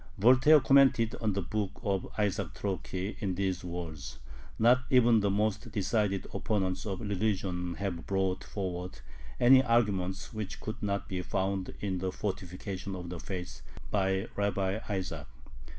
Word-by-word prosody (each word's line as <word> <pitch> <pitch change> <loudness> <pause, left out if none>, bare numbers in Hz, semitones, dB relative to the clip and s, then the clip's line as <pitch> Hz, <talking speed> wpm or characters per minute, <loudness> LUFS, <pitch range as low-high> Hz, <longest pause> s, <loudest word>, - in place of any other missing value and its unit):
Voltaire 130 +8 +7
commented 135 -5 +5
on 110 -3 +1
the 100 -1 -1
book 105 +2 -3
of 95 -2 0
Isaac 100 -4 -1
Troki 95 0 -3
in 95 -4 -1
these 95 -1 -1
words: 85 -4 -6 0.4
"Not 120 +3 +5
even 120 -4 +5
the 100 -1 +1
most 105 +3 0
decided 100 -1 0
opponents 95 -2 -1
of 95 0 -3
religion 95 -4 -1
have 95 -4 -4
brought 95 -1 0
forward 90 -2 -5 0.4
any 130 +2 +7
arguments 100 -6 0
which 110 -3 -5
could 110 - -6
not 100 -1 -1
be 90 -1 -3
found 95 +1 -2
in 95 -3 -1
the 95 0 -2
'Fortification 95 0 -4
of 90 -2 -6
the 90 -1 -6
Faith' 90 +2 -6 0.3
by 95 -1 +1
Rabbi 100 0 0
Isaac." 90 -7 -3
100 Hz, 145 wpm, -30 LUFS, 95-105 Hz, 0.4 s, Voltaire